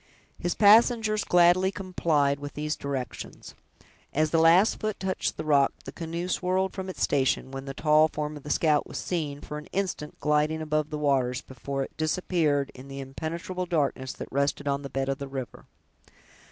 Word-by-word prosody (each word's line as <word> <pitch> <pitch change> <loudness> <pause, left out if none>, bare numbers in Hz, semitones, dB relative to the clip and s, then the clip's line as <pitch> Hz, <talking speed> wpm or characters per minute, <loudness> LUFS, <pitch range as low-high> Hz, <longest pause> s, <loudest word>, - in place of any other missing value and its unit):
His 175 - -1
passengers 215 0 +5
gladly 180 +2 +4
complied 160 -8 0
with 145 0 -7
these 150 +1 -2
directions. 135 -3 -6 0.6
As 155 +1 +1
the 165 - +3
last 170 +6 +5
foot 215 -1 -3
touched 190 -1 -2
the 155 - -4
rock, 140 -2 +4
the 135 - -6
canoe 170 +3 -4
whirled 185 +1 0
from 190 -1 -5
its 185 - -3
station, 130 -1 +1
when 135 0 -6
the 135 -1 -6
tall 155 0 +4
form 150 -1 -4
of 145 - -9
the 150 - -9
scout 150 0 +2
was - - -7
seen, 150 -5 -3
for 150 - -6
an 150 - -12
instant, 185 -6 -3
gliding 150 +1 +1
above 155 -1 -1
the 150 - -4
waters, 135 -4 +1
before 135 +1 -4
it - - -10
disappeared 155 -3 0
in 130 +2 -12
the 135 0 -7
impenetrable 165 +6 -5
darkness 140 -5 0
that - - -7
rested 140 +1 0
on 140 0 0
the 140 - -7
bed 135 0 -2
of 135 +1 -2
the 140 - -5
river. 135 -2 -7
150 Hz, 185 wpm, -27 LUFS, 140-175 Hz, 0.6 s, passengers